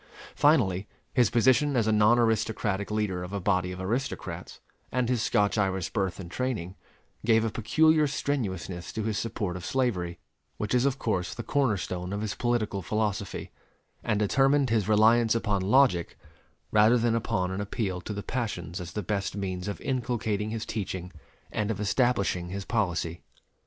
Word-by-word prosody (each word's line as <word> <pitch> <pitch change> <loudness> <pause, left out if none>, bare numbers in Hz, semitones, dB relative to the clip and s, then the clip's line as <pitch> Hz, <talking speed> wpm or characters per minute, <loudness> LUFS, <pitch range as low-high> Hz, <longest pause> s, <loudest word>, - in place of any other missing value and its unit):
Finally, 105 - +3 0.3
his 120 -5 +4
position 130 +4 +3
as 115 - +3
a 110 - +2
non 105 +2 +5
aristocratic 110 -3 0
leader 105 -4 -1
of 90 +2 -7
a 100 - -1
body 90 -1 +1
of 90 - -7
aristocrats, 95 -4 -4 0.3
and 125 -1 +1
his 125 -2 +1
Scotch 105 -2 +2
Irish 95 -4 0
birth 95 -3 -1
and 85 -2 -8
training, 110 -9 -2 0.5
gave 115 -1 +4
a 110 - -1
peculiar 155 +7 +3
strenuousness 95 - -3
to 110 - -2
his 105 -2 -1
support 105 -5 -3
of 90 - -6
slavery, 90 -9 -1 0.4
which 105 - -2
is 125 +1 +3
of 135 -1 0
course 90 -8 -1
the 120 - -5
corner 130 -3 +1
stone 90 +1 -4
of 105 - -2
his 105 -1 -2
political 115 -5 -1
philosophy; 105 0 -2 0.5
and 105 - +1
determined 135 +5 +3
his 110 -2 +1
reliance 110 +2 +5
upon 105 -4 0
logic 100 -4 +3 0.5
rather 110 +3 +5
than 115 -1 +2
upon 95 -5 0
an 95 +2 -3
appeal 100 -3 -2
to 105 - -6
the 100 -1 -4
passions 100 -8 -3
as 85 -1 -7
the 105 - -3
best 100 +2 -2
means 95 -2 -3
of 100 - -4
inculcating 115 -5 -1
his 110 0 -4
teaching 95 -4 -4 0.4
and 110 -1 -1
of 110 - -2
establishing 100 -5 +1
his 95 +1 -5
policy. 90 -7 -1
105 Hz, 170 wpm, -28 LUFS, 95-120 Hz, 0.5 s, non